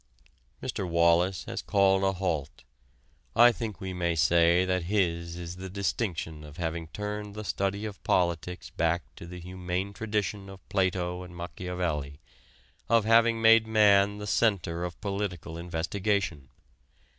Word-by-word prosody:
Mr. 90 - -3
Wallas 85 +1 +3
has - - -4
called 95 -1 +3
a 95 0 +2
halt. 80 -6 -3 0.7
I 120 +1 +8
think 110 -4 -5
we 95 -1 -5
may 85 -2 0
say 85 +3 +4
that 90 -2 0
his 85 -4 0
is 85 0 -7
the 95 0 -7
distinction 90 -5 -3
of 75 +1 -12
having 80 -1 -3
turned 105 +3 -5
the 105 - -5
study 100 +1 -2
of 105 -2 -8
politics 90 0 0
back 85 +1 0
to 85 - -9
the 90 +1 -8
humane 90 +2 -4
tradition 105 -1 -3
of 95 -1 -13
Plato 90 -2 0
and 90 -1 -10
Machiavelli 85 -4 -4 0.7
of 115 -2 +4
having 115 0 +4
made 115 0 +7
man 105 -2 +4
the 105 - -6
center 95 -6 +1
of 85 - -7
political 100 -5 -3
investigation. 85 -2 -2
90 Hz, 145 wpm, -28 LUFS, 85-100 Hz, 0.7 s, I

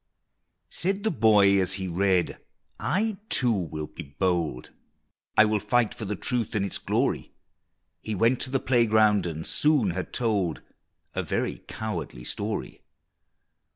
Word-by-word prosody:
Said 195 +3 -1
the 220 - +1
boy 105 - +5
as 95 +1 0
he 95 -1 -3
read, 90 0 +1 0.4
"I 210 +2 0
too 125 -2 +3
will 80 -7 -2
be - - -9 0.2
bold, 85 -9 -1 0.7
I 110 - +8
will 105 0 +1
fight 110 +2 +1
for 110 - -6
the 105 +1 -2
truth 115 +2 -1
and 100 -2 +1
its 100 - -4
glory!" - - -1 0.7
He 110 - -4
went 115 +6 +2
to - - 0
the 135 0 +1
playground, 110 -6 +3
and 80 -1 -5
soon 145 - +2
had 90 +1 -4
told 100 -9 0 0.5
A - - -1
very - - -2
cowardly 85 - -5
story! - - -4
105 Hz, 145 wpm, -26 LUFS, 90-120 Hz, 0.7 s, I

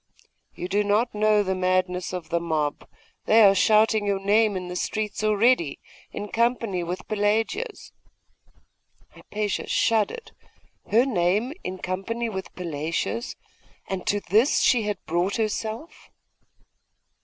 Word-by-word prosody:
'You 180 - -5
do 205 +2 +1
not 210 +4 +1
know 210 0 +3
the 190 -1 -1
madness 185 -1 0
of 180 -3 -6
the 170 - +1
mob; 155 -3 -2 0.4
they 220 +1 +6
are 195 -1 +7
shouting 215 +1 +3
your 200 -1 +1
name 205 +1 +2
in 180 -1 -5
the 180 - -6
streets 215 +3 -3
already, 215 - +2 0.3
in 205 - -6
company 230 -5 0
with 175 +2 -5
Pelagia's.' 225 - -1 1.2
Hypatia 210 -1 -4
shuddered. 230 - 0 0.6
Her 235 +4 +4
name 210 +2 +1
in 185 - -4
company 195 +6 -3
with 190 -3 -6
Pelagia's! 165 - -3 0.5
And 190 -1 -5
to 205 0 +1
this 220 +9 +3
she 245 - +4
had 205 -2 -1
brought 175 +4 0
herself! 220 +5 -4
205 Hz, 130 wpm, -25 LUFS, 185-220 Hz, 1.2 s, are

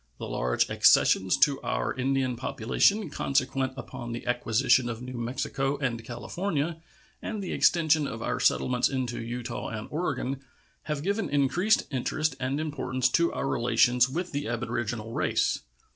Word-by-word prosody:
The - - -6
large - - 0
accessions 95 -1 +4
to 140 -2 +4
our - - -1
Indian 130 -1 0
population 130 - +1
consequent 135 -1 0
upon 120 -2 -7
the 120 - -6
acquisition 120 +1 +2
of 115 -2 -4
New 125 +1 -7
Mexico 135 +3 -2
and 120 -5 -2
California 160 - -3 0.4
and 215 - -4
the 185 - -4
extension 160 -3 +3
of 115 - -5
our - - -1
settlements 125 -1 +2
into 125 -4 -2
Utah 120 +1 -5
and 110 -1 -5
Oregon 140 -4 -2 0.4
have 150 -2 -3
given 200 +3 -1
increased 160 +9 +2
interest 155 +4 -1
and 130 +3 -1
importance 130 -4 -1
to 170 +4 +2
our - - -2
relations 120 0 +3
with 175 +6 -3
the 145 -2 -3
aboriginal 115 -1 -3
race. - - +1
130 Hz, 145 wpm, -27 LUFS, 120-150 Hz, 0.4 s, accessions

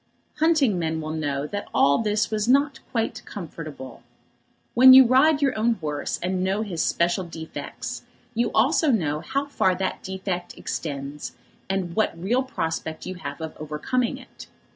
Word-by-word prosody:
Hunting 300 - +3
men 160 -1 -1
will 155 0 -4
know 145 -3 -2
that 205 +6 -5
all 140 0 +4
this 210 0 0
was 215 0 0
not 275 +1 +3
quite 225 -2 -2
comfortable. 155 - -8 0.7
When 260 +2 +9
you 265 0 +10
ride 285 +4 +4
your 275 - +2
own 225 +2 +2
horse, 150 -6 -3
and 185 +1 -1
know 195 +3 0
his 180 -7 -3
special 175 +3 +1
defects, 165 -2 -7 0.3
you 235 +1 +1
know - - -5
also 220 - +2
how 275 +1 -2
far 190 -10 +1
that 190 +1 -3
defect 190 -2 -4
extends, 140 -1 -5 0.4
and 190 -3 -2
what 215 -6 0
real 230 +9 +1
prospect 165 -10 -4
you 185 - -4
have 180 -2 -7
of 160 -1 -6
overcoming 155 +12 -1
it. - - -13
190 Hz, 160 wpm, -24 LUFS, 160-240 Hz, 0.7 s, you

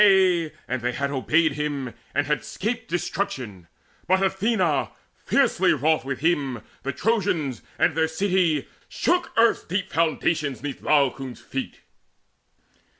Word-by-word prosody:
Yea, 185 -5 +4 0.2
and 130 0 -2
they 125 +1 -1
had 140 +2 -2
obeyed 155 +4 +2
him, 140 -4 -3 0.2
and 145 +1 +2
had 150 0 0
'scaped 225 +5 -3
Destruction; 155 - -3 0.4
but 190 +2 +3
Athena, 190 - +1 0.2
fiercely - - +2
wroth 155 +3 +2
With 135 0 -4
him, 140 -8 0 0.2
the 140 - -2
Trojans, 170 - 0 0.2
and - - +3
their 160 0 +2
city, 170 -3 +1 0.2
shook 355 0 0
Earth's 230 0 +4
deep 190 +2 -3
foundations 155 -5 0
'neath 145 -2 -5
Laocoon's 135 -3 +1
feet. 135 -1 -6
155 Hz, 130 wpm, -24 LUFS, 135-185 Hz, 0.4 s, Yea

